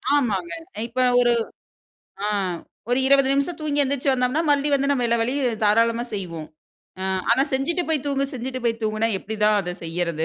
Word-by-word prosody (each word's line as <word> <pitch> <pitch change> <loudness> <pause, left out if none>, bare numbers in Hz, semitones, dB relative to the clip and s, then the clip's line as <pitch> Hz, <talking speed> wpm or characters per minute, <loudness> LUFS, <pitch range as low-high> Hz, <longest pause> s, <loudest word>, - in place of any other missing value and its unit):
ஆமாங்க. 195 -11 0 0.2
அ - - -11
இப்ப 240 +2 -18
நான் 245 0 +4
ஒரு 240 -1 +4 0.9
ஆ - - 0 0.6
ஒரு 250 - +3
20 275 -1 +5
நிமிஷம் 280 +5 0
தூங்கி 290 -1 0
எந்திருச்சு 275 0 0
வந்தோம்ன்னா, 255 +4 +1
மறுபடியும் 285 0 +3
வந்து 275 +1 0
நம்ம 250 -4 +1
எல்லா 235 0 +1
வேலையும் 245 -2 -1
தாராளமா 230 +3 +3
செய்வோம். 165 -5 -5 0.5
ஆ - - -3 0.3
ஆனா 260 +3 +4
செஞ்சிட்டு 325 +7 0
போய் 295 -3 +1
தூங்கு 275 -1 0
செஞ்சிட்டு 255 0 -5
போய் 230 0 -1
தூங்குன்னா, 215 +1 0
எப்பிடிதான் 210 0 +1
அத 180 0 -4
செய்யுறது? 165 -1 -2
245 Hz, 175 wpm, -23 LUFS, 215-275 Hz, 0.9 s, 20